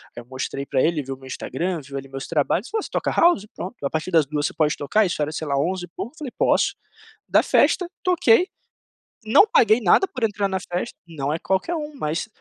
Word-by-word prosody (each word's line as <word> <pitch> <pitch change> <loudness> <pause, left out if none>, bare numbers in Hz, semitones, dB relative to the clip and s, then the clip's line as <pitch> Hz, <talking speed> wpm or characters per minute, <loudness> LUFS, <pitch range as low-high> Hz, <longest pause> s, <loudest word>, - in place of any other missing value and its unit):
Aí 120 - -7
eu - - -17
mostrei 130 +2 -5
pra 130 -2 +1
ele, 160 -2 +1
viu 135 -1 -6
meu 130 - -15
Instagram, 165 +6 -3
viu 140 0 -8
ali 135 0 -7
meus 135 0 -6
trabalhos, 170 - 0
falou: 440 +1 -2
"Você - - -8
toca - - -1
house? 335 - +3
Pronto, 185 - -6
a - - +1
partir 160 +4 -3
das 165 -4 +4
2h 145 0 -1
você - - -7
pode 150 -2 +1
tocar". 210 +10 +2
Isso 175 -4 -2
era, 150 - -3
sei 155 0 -5
lá, 140 -1 0
onze 175 +5 -1
e - - -20
pouco, 225 - -7
falei: 285 -5 -6
"Posso". - - +2 0.5
Da - - +4
festa, 360 - +3
toquei, 360 - +4 0.8
não 225 - +6
paguei 425 - +4
nada 215 - +5
por 255 -10 -3
entrar 205 -2 0
na 190 -1 -1
festa 180 +6 -4
não 145 -4 -4
é 160 - -1
qualquer 190 - -1
um, 300 -2 -5
mas, 160 - -2
175 Hz, 230 wpm, -23 LUFS, 145-230 Hz, 0.8 s, não